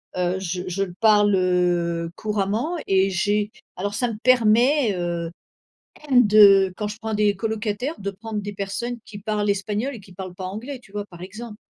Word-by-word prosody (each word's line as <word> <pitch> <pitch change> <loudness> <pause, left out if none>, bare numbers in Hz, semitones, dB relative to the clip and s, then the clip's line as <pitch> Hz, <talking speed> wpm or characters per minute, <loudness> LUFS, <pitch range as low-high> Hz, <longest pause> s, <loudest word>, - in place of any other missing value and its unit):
heu 180 +1 0
je 180 -1 -3
je 185 +2 -1
le 180 -3 -6
parle, 205 -2 +5
heu, 175 -2 +1
couramment 215 - -1
et 195 0 +3
j'ai 205 +3 0 0.3
alors 200 +3 -3
ça 245 +2 0
me 215 - -6
permet, 245 +1 +4
heu, 170 -1 -3 0.8
de 205 -6 +6
quand 210 -1 -3
je 210 - -7
prends 220 0 -3
des 210 -1 +2
colocataires 220 +6 -2
de 200 0 -3
prendre 215 +1 -5
des 205 0 -6
personnes 200 +5 -4
qui 205 - -9
parlent 210 0 -1
espagnol 210 +6 -1
et 220 - -10
qui 190 -1 -17
parlent 185 -1 -8
pas 185 - -6
anglais, 240 +8 -6
tu 215 - -20
vois, 205 0 -4
par 175 -4 -14
exemple. 215 +4 -8
205 Hz, 185 wpm, -23 LUFS, 190-220 Hz, 0.8 s, de